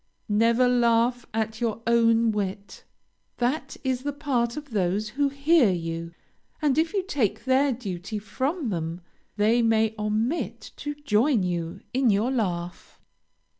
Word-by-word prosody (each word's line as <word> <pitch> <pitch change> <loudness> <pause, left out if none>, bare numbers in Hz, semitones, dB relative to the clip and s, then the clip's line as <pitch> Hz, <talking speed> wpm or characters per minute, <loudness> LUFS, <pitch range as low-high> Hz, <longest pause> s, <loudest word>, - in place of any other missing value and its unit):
Never 230 +4 +3
laugh 240 0 +2
at 220 +1 -2
your 230 -2 -1
own 230 0 +4
wit. 200 -1 -4 0.5
That 250 +6 -1
is 260 -2 -1
the 290 +2 -2
part 265 -5 -1
of 295 -3 -8
those 200 +1 0
who 280 +5 0
hear 280 -2 +4
you, 165 -1 -4 0.4
and 295 -1 +2
if 325 +1 +1
you 400 -2 0
take 220 - -1
their 265 +2 +3
duty 210 -4 -5
from 260 - -2
them, 165 -2 -3 0.4
they 220 +3 +3
may 220 -1 +2
omit 215 +9 -2
to 295 0 -4
join 255 -4 +2
you 170 -2 -3
in 260 -1 +3
your 215 +5 +2
laugh. 180 -8 -3
230 Hz, 140 wpm, -26 LUFS, 205-265 Hz, 0.5 s, own